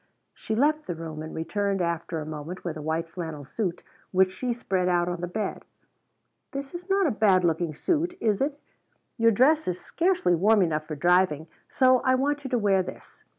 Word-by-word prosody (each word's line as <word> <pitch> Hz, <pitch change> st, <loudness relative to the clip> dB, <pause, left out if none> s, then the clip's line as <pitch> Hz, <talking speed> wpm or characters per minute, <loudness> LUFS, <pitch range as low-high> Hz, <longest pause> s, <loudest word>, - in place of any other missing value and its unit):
She 220 Hz, -, -4 dB
left 300 Hz, +5 st, +2 dB
the 175 Hz, -, -3 dB
room 160 Hz, -1 st, -7 dB
and 160 Hz, -, -7 dB
returned 195 Hz, +4 st, -1 dB
after 170 Hz, -1 st, -2 dB
a 155 Hz, -, -5 dB
moment 155 Hz, +4 st, -7 dB
with 170 Hz, -3 st, -3 dB
a 155 Hz, -, -6 dB
white 160 Hz, +2 st, -2 dB
flannel 160 Hz, -4 st, -6 dB
suit 175 Hz, +5 st, -3 dB, 0.3 s
which 185 Hz, 0 st, +3 dB
she 250 Hz, +6 st, -3 dB
spread 190 Hz, -6 st, -1 dB
out 175 Hz, -1 st, +2 dB
on 175 Hz, -1 st, -3 dB
the 175 Hz, -, -2 dB
bed. 210 Hz, +4 st, -4 dB, 0.9 s
"This 275 Hz, +2 st, -5 dB
is 355 Hz, +2 st, -8 dB
not 390 Hz, 0 st, +3 dB
a 300 Hz, -, +2 dB
bad 200 Hz, -4 st, +3 dB
looking 165 Hz, -2 st, 0 dB
suit, 345 Hz, -, -1 dB
is 215 Hz, -1 st, +1 dB
it? 285 Hz, +1 st, -1 dB, 0.6 s
Your 230 Hz, 0 st, +6 dB
dress 280 Hz, +8 st, +3 dB
is 180 Hz, -1 st, -2 dB
scarcely 345 Hz, -, +1 dB
warm 200 Hz, +4 st, +4 dB
enough 155 Hz, -2 st, -1 dB
for 155 Hz, -, -4 dB
driving, 175 Hz, -1 st, +2 dB, 0.2 s
so 255 Hz, -1 st, +4 dB
I 260 Hz, +1 st, +2 dB
want 285 Hz, +2 st, 0 dB
you 265 Hz, -, -5 dB
to 245 Hz, -, +1 dB
wear 200 Hz, -4 st, +3 dB
this. -, -, -10 dB
190 Hz, 200 wpm, -26 LUFS, 165-255 Hz, 0.9 s, Your